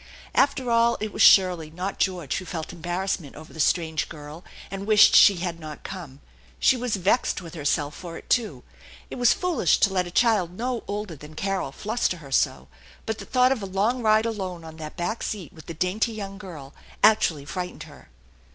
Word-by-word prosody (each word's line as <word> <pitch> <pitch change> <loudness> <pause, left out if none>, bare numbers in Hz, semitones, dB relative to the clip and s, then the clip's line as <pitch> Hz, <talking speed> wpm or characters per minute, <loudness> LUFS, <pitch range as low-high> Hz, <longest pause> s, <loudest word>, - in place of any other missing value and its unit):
After 270 -3 +2
all, 235 0 +3
it 215 -1 -4
was - - -2
Shirley, 180 -5 +6
not 180 +5 -5
George, 180 -7 -1
who 185 - -6
felt 165 -1 -6
embarrass 175 +3 -2
ment 145 -5 -12
over 155 +1 -12
the 160 - -11
strange 160 0 +1
girl 150 +2 -10 0.3
and 195 +1 -6
wished 215 0 +6
she 200 - +8
had 175 -1 -4
not 155 -2 -9
come. 160 -8 -8 0.4
She - - +4
was 245 -3 -1
vexed 195 +6 +1
with 170 -3 -10
herself 145 -2 -1
for 170 0 -8
it, - - -13
too. 235 -4 0 0.5
It - - -6
was 245 -2 +5
foolish 335 - +2
to 195 - +3
let 180 -1 0
a - - -6
child 195 -3 +2
no 245 0 -2
older 205 -4 -4
than 150 +2 -13
Carol 195 -7 -2
fluster 215 - -2
her 140 -4 -13
so, 65 - +1 0.4
but 220 -1 -3
the - - -8
thought 255 0 +3
of 260 -5 0
a 195 - -4
long 210 +7 0
ride 215 0 +3
alone 190 -6 -4
on 160 0 -11
that 155 -1 -8
back 215 +7 -2
seat 195 -7 -5
with 160 - -14
the 170 - -5
dainty 195 +7 0
young 195 -2 -7
girl 155 -9 -10 0.3
actually 165 -9 +4
frightened 180 +4 -5
her. - - -15
185 Hz, 205 wpm, -25 LUFS, 160-215 Hz, 0.5 s, she